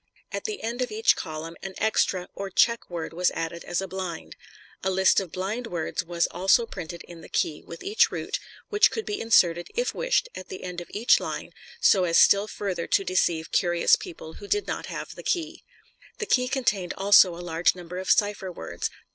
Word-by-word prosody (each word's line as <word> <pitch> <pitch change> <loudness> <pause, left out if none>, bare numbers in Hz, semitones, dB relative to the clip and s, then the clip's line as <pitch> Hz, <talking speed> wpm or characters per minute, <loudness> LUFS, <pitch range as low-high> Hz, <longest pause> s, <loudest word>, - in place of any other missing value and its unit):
At - - -4
the 430 -2 -4
end 235 +3 -3
of 250 - -1
each 220 +1 +3
column 160 0 -6
an 190 -1 -7
"extra" 190 -4 +1
or 200 0 -5
"check" 230 +5 +2
word 170 -2 -5
was 180 +2 +2
added 165 +1 -4
as 175 +2 -2
a 195 - -4
blind. 185 -3 -6 0.5
A 190 - +1
list 190 0 +4
of 190 -4 -6
"blind" 210 +7 -3
words 175 -1 -3
was 170 0 0
also 195 +5 +3
printed 175 -5 -7
in 170 -1 -12
the - - -13
key, 150 - -1
with 170 - -10
each 420 +3 +3
route, - - -3 0.3
which 420 0 +5
could 445 - -4
be 415 -1 -3
inserted, 175 -6 +3
if 485 +1 0
wished, - - +1
at 185 - -8
the 185 - -7
end 180 -1 -5
of 175 - -11
each 225 +4 +3
line - - -5 0.3
so 205 - +5
as 170 -1 +2
still 200 +1 +6
further 190 -5 -4
to - - +2
deceive 170 -3 0
curious 175 -1 +4
people 160 -1 -9
who 205 - -8
did 415 - +1
not - - -4
have - - -6
the - - -10
key. 335 -1 -2 0.5
The 440 - -3
key 250 - +2
contained 225 -9 -1
also 195 -2 +6
a - - -10
large 165 +2 +2
number 180 0 -7
of 190 - -5
cipher 205 -2 +2
words. 85 - -4
190 Hz, 205 wpm, -26 LUFS, 175-225 Hz, 0.5 s, still